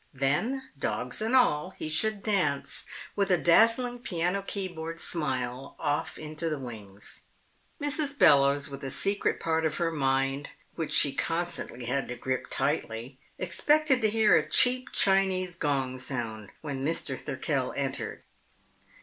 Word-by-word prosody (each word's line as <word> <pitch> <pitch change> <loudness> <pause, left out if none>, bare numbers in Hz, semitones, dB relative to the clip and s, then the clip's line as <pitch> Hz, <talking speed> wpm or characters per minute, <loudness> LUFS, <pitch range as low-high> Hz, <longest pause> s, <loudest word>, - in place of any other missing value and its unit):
Then, 145 - 0 0.2
dogs 125 - -2
and 225 +4 +1
all, 185 -8 +3
he - - -5
should 205 +6 +1
dance 180 -10 0 0.3
with 200 -1 +1
a 180 - +4
dazzling 230 +8 +4
piano 180 -4 -1
keyboard 170 -5 -5
smile 130 -4 -2
off 145 0 -2
into 155 +2 -4
the 155 - -2
wings. 105 -6 -10 0.6
Mrs. 290 -1 0
Bellowes, 140 - +5
with 140 0 -8
a 135 - -3
secret 200 +9 0
part 160 0 0
of 155 -1 0
her 170 -1 0
mind 135 -1 0 0.2
which 165 -2 -4
she 140 - +4
constantly 165 -7 -2
had 135 +3 -1
to 125 - -5
grip 130 +1 -3
tightly, 120 +4 -2 0.2
expected 275 - +2
to 215 - +3
hear 220 0 +4
a - - +1
cheap 255 +1 +4
Chinese 190 -2 +2
gong 135 -6 -1
sound 115 -5 -4
when 140 -3 -4
Mr. 165 +4 0
Thirkell - - -2
entered. - - -3
160 Hz, 140 wpm, -28 LUFS, 135-200 Hz, 0.6 s, Bellowes